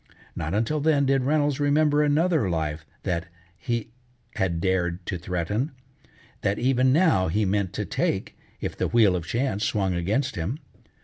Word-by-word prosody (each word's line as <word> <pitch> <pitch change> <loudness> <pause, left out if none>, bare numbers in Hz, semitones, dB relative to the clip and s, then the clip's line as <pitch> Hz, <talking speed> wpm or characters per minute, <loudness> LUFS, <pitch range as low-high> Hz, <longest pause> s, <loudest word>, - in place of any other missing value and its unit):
Not 80 +6 -2
until 115 +8 0
then 145 -1 +3
did 135 0 +2
Reynolds 145 -1 +1
remember 145 +1 +3
another 150 - +2
life 80 -2 -2 0.2
that 85 -3 -2 0.4
be 120 -1 -1 0.4
had 85 -3 0
dared 90 -1 0
to 90 - -3
threaten, 95 - -2 0.7
that 100 +1 0
even 130 0 +3
now 145 - +3
he 105 +5 +1
meant 100 -1 0
to - - -3
take - - -1 0.2
if - - -4
the - - -1
wheel 110 -6 +4
of 85 -2 -4
chance 115 -4 -1
swung 100 -4 0
against 100 +10 -1
him. 90 - -2
105 Hz, 160 wpm, -25 LUFS, 90-140 Hz, 0.7 s, wheel